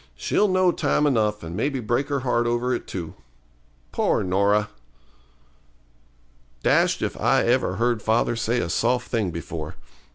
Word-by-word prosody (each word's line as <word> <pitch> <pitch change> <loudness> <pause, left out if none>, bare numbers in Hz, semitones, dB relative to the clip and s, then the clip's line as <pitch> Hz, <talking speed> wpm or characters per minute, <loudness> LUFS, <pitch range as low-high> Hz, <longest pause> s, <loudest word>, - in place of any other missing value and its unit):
'She'll 205 - +1
know 185 -1 +3
time 150 - +1
enough, 105 -7 +1
and 85 +1 -6
maybe 135 +5 -1
break 120 +4 -1
her 140 -2 -1
heart 120 -2 +1
over 120 +2 0
it, 120 - -4
too. 85 -4 -6 0.8
Poor - - +1
Norah!' 100 +3 +2 1.9
Dashed - - +2
if - - -2
I - - +3
ever 90 - +1
heard 115 +1 0
father 115 +2 +1
say 115 +2 0
a 85 - -3
soft 125 0 0
thing 110 -6 0
before. 85 -2 -6
115 Hz, 150 wpm, -24 LUFS, 100-125 Hz, 1.9 s, know